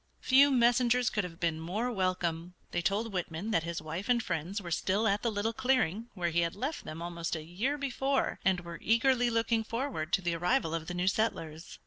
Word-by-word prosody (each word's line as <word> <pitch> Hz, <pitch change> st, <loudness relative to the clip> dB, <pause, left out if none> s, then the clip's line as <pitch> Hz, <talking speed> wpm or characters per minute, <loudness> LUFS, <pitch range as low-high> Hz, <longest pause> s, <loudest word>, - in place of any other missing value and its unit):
Few 275 Hz, +2 st, +6 dB
messengers 245 Hz, -1 st, +3 dB
could 210 Hz, -, 0 dB
have 165 Hz, -2 st, -8 dB
been 165 Hz, -2 st, 0 dB
more 205 Hz, +10 st, -2 dB
welcome. 180 Hz, -4 st, -1 dB, 0.2 s
They 175 Hz, -, 0 dB
told 205 Hz, +4 st, -1 dB
Whitman 180 Hz, +3 st, -3 dB
that 165 Hz, -, +3 dB
his 170 Hz, -1 st, -4 dB
wife 165 Hz, +7 st, -5 dB
and 240 Hz, -2 st, +3 dB
friends 175 Hz, +4 st, -2 dB
were 175 Hz, -4 st, -7 dB
still 195 Hz, +6 st, +1 dB
at 200 Hz, 0 st, +1 dB
the 235 Hz, -, +1 dB
little 215 Hz, +2 st, -1 dB
clearing 245 Hz, -5 st, +1 dB
where 175 Hz, -3 st, -1 dB
he 170 Hz, -, +2 dB
had 170 Hz, -1 st, 0 dB
left 285 Hz, +5 st, -4 dB
them 160 Hz, +2 st, -6 dB
almost 170 Hz, -1 st, -3 dB
a 160 Hz, -, -5 dB
year 210 Hz, -, -2 dB
before, 275 Hz, 0 st, -1 dB
and 185 Hz, -1 st, +2 dB
were 170 Hz, -1 st, -8 dB
eagerly 245 Hz, +2 st, +3 dB
looking 230 Hz, -1 st, +1 dB
forward 230 Hz, -, -3 dB
to -, -, +3 dB
the 175 Hz, -1 st, 0 dB
arrival 165 Hz, -1 st, +1 dB
of 165 Hz, -1 st, -3 dB
the 180 Hz, -, -4 dB
new 180 Hz, +1 st, -1 dB
settlers. 165 Hz, -6 st, -1 dB
190 Hz, 210 wpm, -31 LUFS, 170-235 Hz, 0.2 s, Few